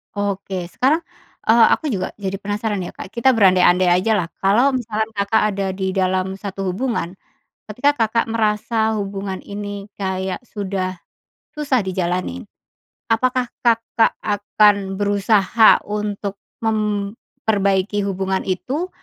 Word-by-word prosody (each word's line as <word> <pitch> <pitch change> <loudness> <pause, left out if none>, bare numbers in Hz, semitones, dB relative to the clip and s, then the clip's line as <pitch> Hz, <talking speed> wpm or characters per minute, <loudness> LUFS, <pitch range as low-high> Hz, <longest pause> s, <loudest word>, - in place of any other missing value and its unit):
Oke, 195 -3 -3
sekarang, 270 - +2 0.5
eee, 225 +1 +7
aku 315 - +1
juga 195 -9 -2
jadi 195 -1 -3
penasaran, 205 0 -2
ya, 175 - -6
Kak. - - -9
Kita 240 +3 +4
berandai-andai 185 -4 +4 0.2
ajalah, 210 -6 +1 0.2
kalau 240 +8 +4
misalkan 220 -3 -1
Kakak 200 +2 +2
ada 195 0 -1
di 190 0 -3
dalam 190 0 0
satu 195 -1 -5
hubungan, 190 -2 -2 0.6
ketika 285 +7 +2
Kakak 230 -2 +1
merasa 220 0 0
hubungan 195 -1 -4
ini 205 0 -6
kayak 190 +2 -3
sudah 190 -5 -4 0.6
susah 280 -6 +1
dijalanin, 185 +6 -2 0.7
apakah 250 +2 +1 0.2
Kakak 230 -1 +2
akan 205 -1 +2
berusaha 205 +2 +4
untuk 205 -1 -4 0.2
memperbaiki 205 -2 -1
hubungan 190 0 -1
itu? 270 - -2
205 Hz, 115 wpm, -20 LUFS, 190-225 Hz, 0.7 s, eee